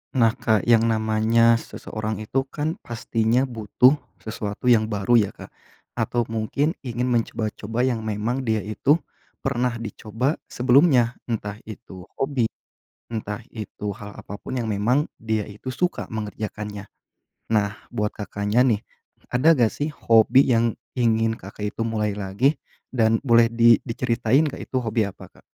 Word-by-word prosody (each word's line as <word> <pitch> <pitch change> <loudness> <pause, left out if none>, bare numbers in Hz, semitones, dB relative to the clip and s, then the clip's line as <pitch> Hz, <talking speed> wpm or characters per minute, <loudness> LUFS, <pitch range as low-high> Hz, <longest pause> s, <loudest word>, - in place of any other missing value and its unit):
Nah, 115 -3 +5
Kak, 110 -2 +2
yang 115 -1 +4
namanya 115 +1 +3
seseorang 110 -1 -5
itu 135 +5 -1
kan, 155 +4 -3
pastinya 115 +1 0
butuh 125 +3 +3 0.2
sesuatu 110 +2 -1
yang 110 -2 +4
baru 110 +2 +3
ya, - - -9
Kak, - - -11 0.5
atau 120 -1 +1
mungkin 115 +7 0
ingin 125 0 -2
mencoba-coba 115 0 -1
yang 125 -3 +1
memang 115 +5 -2
dia 110 -2 +1
itu 110 +8 +2 0.5
pernah 125 0 0
dicoba 115 +5 -2
sebelumnya 125 -1 +4
entah 105 -3 -3
itu 95 -4 -10
hobi, 135 -4 0 0.6
entah 110 -1 -4
itu 105 -2 -6
hal 105 -3 -9
apapun 100 +6 -6
yang 115 - -3
memang 120 +9 +1
dia 110 -2 -2
itu 105 +6 -7
suka 180 +6 -1
mengerjakannya. 105 -1 -5 0.7
Nah, 105 -2 +2 0.2
buat 105 -3 -2
Kakaknya 105 +2 0
nih, 115 -5 +2 0.5
ada 150 +5 +5
nggak 115 -3 +3
sih 145 +2 -2
hobi 115 0 +4
yang 115 -1 +1 0.2
ingin, 115 -2 +2
Kakak 105 0 -6
itu - - -2
mulai 105 -2 -1
lagi 105 +9 +1 0.4
dan 115 -2 +3
boleh 115 -1 +5
di 115 0 +5
diceritain 120 +3 +1
nggak 145 - -5
itu 130 - +1
hobi 115 -2 0
apa, - - -13
Kak? - - -20
115 Hz, 145 wpm, -23 LUFS, 110-125 Hz, 0.7 s, Nah